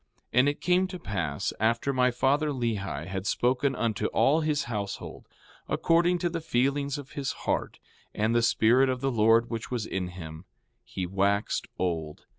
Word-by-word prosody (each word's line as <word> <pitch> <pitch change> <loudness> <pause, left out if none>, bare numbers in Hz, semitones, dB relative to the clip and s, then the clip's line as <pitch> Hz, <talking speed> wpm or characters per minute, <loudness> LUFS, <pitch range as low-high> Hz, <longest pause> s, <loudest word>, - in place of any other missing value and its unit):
4:12 125 - +4
And 135 +3 +5
it 145 - -5
came 180 +1 +3
to 185 0 -7
pass 85 - -3
after 115 +5 +1
my 125 -1 +3
father, 135 +5 +1
Lehi, 105 - -2
had 95 +1 -4
spoken 130 +5 +1
unto 115 -4 -1
all 155 +4 +3
his 150 -2 0
household, 105 -4 -5 0.4
according 170 +2 +3
to 175 0 -1
the 165 -1 -3
feelings 140 0 0
of 140 -4 -9
his 140 +2 -3
heart - - -1 0.3
and 110 +2 0
the 120 - +3
Spirit 120 +3 +4
of 130 -1 -2
the 135 0 0
Lord 115 +1 +3
which 115 -1 -4
was 120 -4 -2
in 95 -3 -3
him, 85 -1 -9 0.4
he 95 - -4
waxed 100 +3 0
old. 80 -4 -3
120 Hz, 175 wpm, -28 LUFS, 100-140 Hz, 0.4 s, And